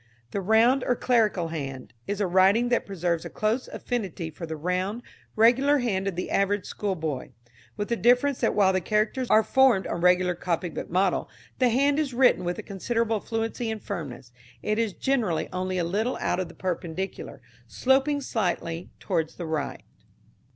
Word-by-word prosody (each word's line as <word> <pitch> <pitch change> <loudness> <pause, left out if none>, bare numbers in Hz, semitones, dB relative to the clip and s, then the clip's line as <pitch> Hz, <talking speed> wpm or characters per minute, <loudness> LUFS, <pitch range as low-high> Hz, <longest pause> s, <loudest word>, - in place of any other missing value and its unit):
The 200 - -2
Round 230 +6 +4
or 245 - +2
Clerical 215 -9 +1
Hand 135 -6 -6
is 205 0 -2
a 205 - +2
writing 190 +6 +4
that 240 - +1
preserves 175 -4 -1
a - - -6
close 220 +4 -1
affinity 195 -9 -4
for 165 +2 -8
the 160 - -4
round 185 +8 -2 0.3
regular 255 +6 +5
hand 200 -7 -1
of 195 - -2
the 180 - -4
average 200 0 +1
school 200 -2 -3
boy, 150 -6 -4 0.4
with 205 -1 -3
the 235 - +1
difference 250 +4 +3
that - - +1
while 190 -2 +4
the 185 - +1
characters 215 +6 0
are 220 - +6
formed 260 -7 +4
on 170 - -3
regular 180 0 +4
copybook 175 -1 -3
model, 185 +1 +1 0.3
the 255 -2 +4
hand 280 +5 +2
is 275 -5 -2
written 250 -6 +4
with 175 0 -3
considerable 225 +2 -1
fluency 225 +2 -3
and 220 -1 -5
firmness. 140 -10 -6 0.3
It 215 +1 0
is 225 -4 0
generally 220 -6 0
only 185 0 -2
a 175 - +1
little 210 +9 -1
out 180 - 0
of 185 - -2
the - - -14
perpendicular, 185 +1 -4 0.3
sloping 275 +2 +2
slightly 175 -8 -2
towards 165 -5 -2
the 175 - -6
right. 155 -3 -3
200 Hz, 175 wpm, -26 LUFS, 175-235 Hz, 0.4 s, are